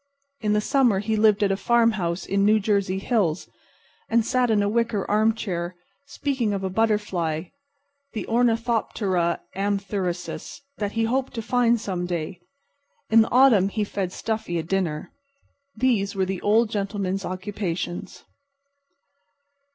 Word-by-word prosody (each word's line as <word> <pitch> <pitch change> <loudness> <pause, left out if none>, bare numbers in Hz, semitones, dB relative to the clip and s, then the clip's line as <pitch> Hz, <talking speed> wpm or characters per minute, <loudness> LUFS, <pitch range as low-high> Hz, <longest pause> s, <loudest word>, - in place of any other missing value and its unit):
In 210 -3 0
the 210 - +2
summer 250 -4 +3
he 215 +3 -1
lived 215 -1 +4
at 195 - +2
a - - +2
farmhouse 205 -5 +1
in 195 - 0
the 210 - +5
New 220 - +4
Jersey 200 -2 0
hills, 190 -6 0 0.6
and 230 -1 +3
sat 250 0 +1
in 210 -2 +3
a - - +1
wicker 225 -2 0
armchair, 205 -5 0 0.3
speaking 260 -7 -1
of 195 -1 -3
a 190 - -2
butterfly, 185 -6 0 0.6
the 220 - -4
ornithoptera 225 -7 +1
amphrisius, 195 0 -3 0.2
that 205 -1 -2
he 225 - 0
hoped 255 +4 -1
to 225 - -3
find 240 0 +2
some 180 -4 -3
day. 175 +1 -4 0.7
In 225 0 +7
the 220 - +1
autumn 240 -7 +5
he 215 +1 -1
fed 195 -3 -3
Stuffy 220 -4 -3
a 165 - -2
dinner. 170 -3 -2 0.7
These 215 -5 +1
were 190 -1 +1
the 190 -1 -4
Old 220 +2 +3
Gentleman's 195 -2 -2
occupations. 185 -1 -4
205 Hz, 145 wpm, -24 LUFS, 185-225 Hz, 0.7 s, In